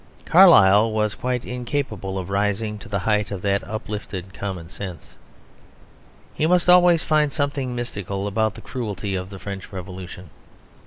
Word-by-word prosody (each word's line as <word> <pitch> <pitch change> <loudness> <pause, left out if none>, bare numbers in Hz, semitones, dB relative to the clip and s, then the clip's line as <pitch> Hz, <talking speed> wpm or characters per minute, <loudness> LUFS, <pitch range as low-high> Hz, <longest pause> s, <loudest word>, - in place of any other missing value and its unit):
Carlyle 100 +3 +7
was 110 -1 0
quite 125 -1 -3
incapable 125 -6 -3
of 95 0 -5
rising 105 +2 -1
to - - -12
the 100 - -1
height 105 +2 0
of 100 -1 -6
that 100 +1 +1
uplifted 105 -3 -6
common 95 -5 -5
sense. 90 -1 -9 1.2
He 155 - 0
must 180 0 +3
always 180 -2 +6
find 150 -2 +2
something 140 -3 -2
mystical 100 -5 -4
about 110 +1 0
the - - -10
cruelty 105 -5 -4
of 95 0 -3
the 100 - -9
French 100 0 -7
Revolution. 90 -2 -8
105 Hz, 150 wpm, -23 LUFS, 95-125 Hz, 1.2 s, Carlyle